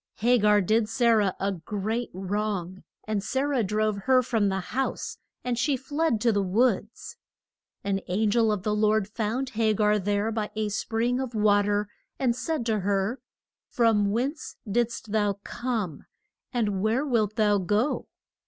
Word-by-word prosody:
Ha 245 Hz, +2 st, +4 dB
gar 210 Hz, 0 st, +4 dB
did 215 Hz, +3 st, +1 dB
Sa 235 Hz, +1 st, +3 dB
rah 205 Hz, -4 st, +3 dB
a 195 Hz, +1 st, 0 dB
great 210 Hz, +6 st, -3 dB
wrong, 190 Hz, -1 st, -3 dB, 0.2 s
and 215 Hz, -2 st, -2 dB
Sa 265 Hz, +4 st, -1 dB
rah 285 Hz, -3 st, +1 dB
drove 215 Hz, 0 st, 0 dB
her 255 Hz, -1 st, +5 dB
from 220 Hz, -4 st, +1 dB
the 190 Hz, 0 st, -1 dB
house, 270 Hz, -, -2 dB, 0.2 s
and 245 Hz, -1 st, -1 dB
she 275 Hz, +2 st, +1 dB
fled 285 Hz, -1 st, 0 dB
to 235 Hz, -, +3 dB
the 205 Hz, -2 st, +1 dB
woods. 215 Hz, +3 st, 0 dB, 0.7 s
An 195 Hz, -1 st, 0 dB
an 205 Hz, +4 st, +1 dB
gel 225 Hz, -1 st, +3 dB
of 205 Hz, -3 st, -2 dB
the 210 Hz, -, 0 dB
Lord 215 Hz, -1 st, +2 dB
found 230 Hz, +5 st, -2 dB
Ha 220 Hz, -1 st, +2 dB
gar 210 Hz, 0 st, +2 dB
there 205 Hz, +3 st, 0 dB
by 215 Hz, -1 st, -2 dB
a 215 Hz, -1 st, -1 dB
spring 230 Hz, +4 st, -1 dB
of 255 Hz, -3 st, -4 dB
wa 210 Hz, -1 st, +4 dB
ter, 205 Hz, 0 st, 0 dB, 0.3 s
and 245 Hz, -3 st, +1 dB
said 310 Hz, -2 st, -2 dB
to 220 Hz, -2 st, +1 dB
her, 200 Hz, +5 st, -1 dB, 0.5 s
From 220 Hz, -4 st, +3 dB
whence 260 Hz, +9 st, -2 dB
didst 230 Hz, 0 st, -1 dB
thou 205 Hz, -2 st, +2 dB
come? 225 Hz, -, -4 dB, 0.4 s
and 210 Hz, -6 st, 0 dB
where 225 Hz, +7 st, +1 dB
wilt 220 Hz, -6 st, +1 dB
thou 210 Hz, -3 st, +3 dB
go? 210 Hz, +9 st, 0 dB
215 Hz, 170 wpm, -26 LUFS, 205-240 Hz, 0.7 s, her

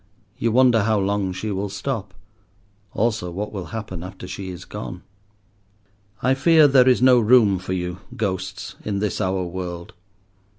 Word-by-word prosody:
You 115 Hz, -, +1 dB
wonder 125 Hz, -1 st, +5 dB
how 110 Hz, -1 st, +2 dB
long 100 Hz, -1 st, 0 dB
she 105 Hz, +4 st, -4 dB
will 100 Hz, +1 st, -2 dB
stop, 100 Hz, 0 st, -4 dB, 0.8 s
also 110 Hz, -5 st, -1 dB
what 100 Hz, +5 st, -5 dB
will 95 Hz, -3 st, -5 dB
happen 105 Hz, -6 st, -6 dB
after 90 Hz, 0 st, -9 dB
she 95 Hz, +1 st, -6 dB
is 90 Hz, 0 st, -8 dB
gone. 105 Hz, -3 st, -7 dB, 1.2 s
I 130 Hz, +2 st, +4 dB
fear 155 Hz, +2 st, +5 dB
there 130 Hz, -2 st, +5 dB
is 125 Hz, -1 st, +3 dB
no 130 Hz, -1 st, +7 dB
room 110 Hz, -4 st, +4 dB
for 95 Hz, 0 st, -4 dB
you, 90 Hz, 0 st, -3 dB, 0.2 s
ghosts, 95 Hz, -2 st, -3 dB
in 105 Hz, -2 st, -2 dB
this 100 Hz, -2 st, -2 dB
our 95 Hz, 0 st, 0 dB
world. 85 Hz, -1 st, -6 dB
100 Hz, 160 wpm, -22 LUFS, 95-115 Hz, 1.2 s, no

